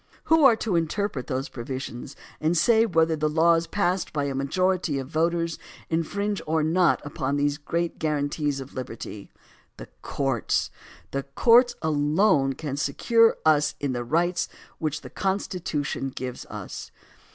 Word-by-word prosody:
Who 320 Hz, -1 st, +4 dB
are 245 Hz, -4 st, +7 dB
to 220 Hz, -4 st, -2 dB
interpret 165 Hz, -3 st, -1 dB
those 135 Hz, -1 st, -2 dB
provisions 130 Hz, +1 st, -6 dB, 0.2 s
and 160 Hz, +3 st, +1 dB
say 225 Hz, +6 st, +4 dB
whether 165 Hz, -4 st, +2 dB
the 155 Hz, 0 st, 0 dB
laws 165 Hz, +1 st, +3 dB
passed 185 Hz, -2 st, 0 dB
by 145 Hz, -1 st, -1 dB
a 140 Hz, -1 st, -2 dB
majority 170 Hz, +3 st, 0 dB
of 135 Hz, -1 st, -4 dB
voters 165 Hz, +1 st, 0 dB, 0.3 s
infringe 200 Hz, +5 st, -1 dB
or 160 Hz, 0 st, +1 dB
not 170 Hz, +2 st, +2 dB
upon 140 Hz, -1 st, -2 dB
these 145 Hz, +1 st, 0 dB
great 170 Hz, +3 st, -2 dB
guarantees 145 Hz, -1 st, -1 dB
of 135 Hz, 0 st, -9 dB
liberty? 115 Hz, -5 st, -7 dB, 0.5 s
The -, -, -10 dB
courts; 135 Hz, -5 st, -1 dB, 0.4 s
the 140 Hz, -, -1 dB
courts 235 Hz, -, +4 dB
alone 150 Hz, -1 st, +2 dB
can 140 Hz, 0 st, -5 dB
secure 230 Hz, -, +3 dB
us 150 Hz, -1 st, +3 dB
in 140 Hz, -2 st, -1 dB
the 120 Hz, -1 st, -2 dB
rights 170 Hz, +7 st, 0 dB, 0.3 s
which 155 Hz, -1 st, -2 dB
the -, -, -11 dB
Constitution 180 Hz, -8 st, -2 dB
gives 130 Hz, -1 st, -6 dB
us. -, -, -7 dB
155 Hz, 145 wpm, -25 LUFS, 140-180 Hz, 0.5 s, are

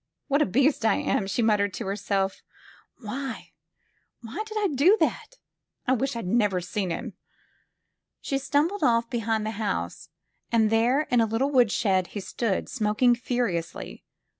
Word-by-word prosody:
What 280 Hz, +2 st, +3 dB
a -, -, +3 dB
beast 270 Hz, +6 st, +2 dB
I 220 Hz, -, +4 dB
am!'' 195 Hz, -, 0 dB
she 215 Hz, +4 st, 0 dB
muttered 205 Hz, -3 st, +2 dB
to 230 Hz, -, -5 dB
herself. 195 Hz, -1 st, -1 dB, 0.6 s
''Why 260 Hz, +4 st, -6 dB, 0.4 s
— -, -, -22 dB
^why 260 Hz, -, -4 dB
did 435 Hz, 0 st, -6 dB
I 415 Hz, -2 st, +1 dB
do 335 Hz, +11 st, +5 dB
that? -, -, -1 dB, 0.5 s
I 255 Hz, -, +3 dB
wish 265 Hz, +1 st, -1 dB
I'd 230 Hz, -, -4 dB
never 205 Hz, -1 st, +2 dB
seen 185 Hz, +2 st, -3 dB
him!" 165 Hz, -, -4 dB, 1.1 s
She 275 Hz, -, -2 dB
stumbled 300 Hz, +8 st, 0 dB
off 230 Hz, 0 st, +2 dB
behind 225 Hz, -2 st, -1 dB
the 220 Hz, 0 st, -4 dB
house, 85 Hz, -, -3 dB, 0.4 s
and 220 Hz, -2 st, +3 dB
there 235 Hz, +5 st, +3 dB
in 245 Hz, -2 st, +4 dB
a 225 Hz, -, +2 dB
lit 225 Hz, +1 st, -1 dB
tle 275 Hz, +1 st, +2 dB
woodshed 205 Hz, -7 st, +2 dB
he -, -, -1 dB
stood, 200 Hz, +1 st, -2 dB
smoking 220 Hz, +2 st, +2 dB
furiously. 235 Hz, -9 st, -3 dB
230 Hz, 165 wpm, -26 LUFS, 205-265 Hz, 1.1 s, do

